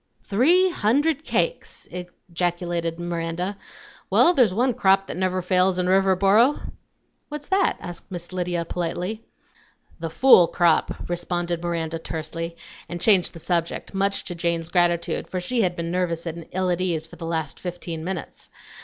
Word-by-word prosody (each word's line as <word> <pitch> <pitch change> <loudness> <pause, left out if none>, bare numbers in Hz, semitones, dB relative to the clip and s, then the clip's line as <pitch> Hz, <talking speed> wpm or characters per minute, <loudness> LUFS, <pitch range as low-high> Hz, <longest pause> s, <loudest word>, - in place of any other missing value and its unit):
"Three 345 - +3
hundred 290 +5 +1
cakes!" - - -2 0.4
ejaculated 175 -1 -1
Miranda. 175 +2 -3 0.5
"Well, 350 - +5
there's 250 - +4
one 245 +6 +1
crop 195 -4 +3
that - - -6
never 185 0 -1
fails 185 +1 +3
in 180 - 0
Riverboro!" 195 +7 +4 0.7
"What's 295 -1 -7
that?" 385 0 +2
asked 175 -1 -9
Miss 175 0 -6
Lydia 175 -2 -1
politely. 180 +6 -3 0.8
"The 165 0 -3
fool 180 - +6
crop," 170 -2 +1
responded 175 -1 -2
Miranda 165 -1 -2
tersely, 165 +1 -5 0.3
and 175 - -5
changed 190 -2 +3
the - - -10
subject, 170 +2 -2
much 195 +1 0
to 175 - -4
Jane's 170 -1 -1
gratitude, 175 -1 +1
for 185 - -2
she 235 +7 0
had 180 -3 +1
been 170 0 -3
nervous 175 -2 -1
and 165 0 -6
ill 185 0 0
at 175 +1 -1
ease 165 -4 -1
for 165 +1 -14
the 165 0 -6
last 160 -3 -3
fifteen 175 -2 -5
minutes. 185 0 -6
175 Hz, 155 wpm, -24 LUFS, 170-195 Hz, 0.8 s, fool